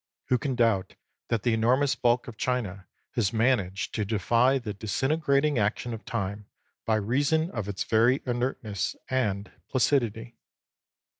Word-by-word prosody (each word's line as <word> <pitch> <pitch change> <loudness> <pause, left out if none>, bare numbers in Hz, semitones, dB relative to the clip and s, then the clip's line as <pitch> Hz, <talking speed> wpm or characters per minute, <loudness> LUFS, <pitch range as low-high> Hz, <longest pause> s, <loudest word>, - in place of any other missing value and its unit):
Who 125 - +3
can 135 -1 -2
doubt 115 -6 +1 0.3
that 115 -4 -1
the 120 - +2
enormous 125 +5 +3
bulk 120 -1 +1
of 120 - -8
China 105 -6 -2 0.2
has 115 -6 0
managed 110 -5 +1
to 105 - -1
defy 115 +6 +2
the 115 -5 -5
disintegrating 140 +6 +1
action 110 +3 -1
of 110 - -8
time 100 -2 -3 0.4
by 110 - +3
reason 140 - +1
of 110 -4 -4
its 100 - -2
very 120 +4 +3
inertness 120 -5 -2 0.2
and 105 -6 -1 0.2
placidity 120 -3 0
115 Hz, 140 wpm, -27 LUFS, 105-130 Hz, 0.4 s, Who